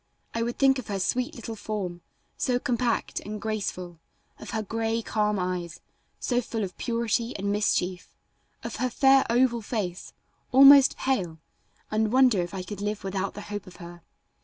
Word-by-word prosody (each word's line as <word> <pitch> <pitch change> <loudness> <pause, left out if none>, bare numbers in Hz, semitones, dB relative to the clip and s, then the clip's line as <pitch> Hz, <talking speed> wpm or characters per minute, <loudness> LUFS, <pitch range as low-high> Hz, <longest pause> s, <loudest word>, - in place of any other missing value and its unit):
I 230 - -1
would 235 +1 -2
think 270 -1 +4
of 250 - -8
her 200 -2 -2
sweet 250 +6 -1
little 230 -1 -6
form, 195 -5 -4 0.3
so 250 -1 0
compact 245 -1 -1
and 210 +1 -7
graceful; 190 -5 -4 0.4
of - - -9
her 220 -1 -2
gray, 225 +2 -2
calm 210 -1 0
eyes, 180 -2 -3 0.4
so 245 -1 0
full 225 -2 -4
of 185 -2 -5
purity 235 0 -1
and 200 +1 -2
mischief; 185 -3 0 0.5
of - - -5
her 255 - 0
fair 270 +2 +5
oval 240 0 +2
face, 200 -5 -4 0.4
almost 275 +1 +8
pale, 185 -12 -1 0.5
and 215 0 +1
wonder 250 -6 +5
if 175 - -4
I 185 - -4
could 200 +1 -7
live 210 0 -3
without 195 0 -3
the 205 - -6
hope 205 -1 -6
of 185 - -12
her. 175 0 -11
215 Hz, 170 wpm, -26 LUFS, 190-240 Hz, 0.5 s, almost